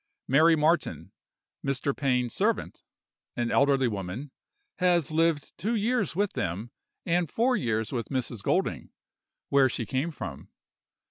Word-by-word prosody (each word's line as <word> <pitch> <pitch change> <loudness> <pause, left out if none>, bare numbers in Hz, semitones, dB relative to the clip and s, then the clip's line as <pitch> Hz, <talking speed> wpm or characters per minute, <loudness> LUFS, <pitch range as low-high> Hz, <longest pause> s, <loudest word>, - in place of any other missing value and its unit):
Mary 160 +5 +5
Martin, 160 +3 0 0.5
Mr. 140 0 -1
Pain's 125 -3 0
servant, - - -1 0.6
an 120 -1 0
elderly 135 -2 +3
woman, 105 +6 -5 0.5
has 175 -4 +2
lived 160 -2 +1
two 220 +7 0
years 220 -3 0
with 200 +1 0
them 100 +8 -3 0.3
and 170 -2 +1
four 250 - +2
years 110 - -1
with 120 -3 -3
Mrs. 125 -5 -3
Golding, - - 0 0.6
where 135 -1 +5
she 120 - -3
came 135 +8 -1
from. 160 - -7
140 Hz, 130 wpm, -28 LUFS, 125-170 Hz, 0.6 s, Mary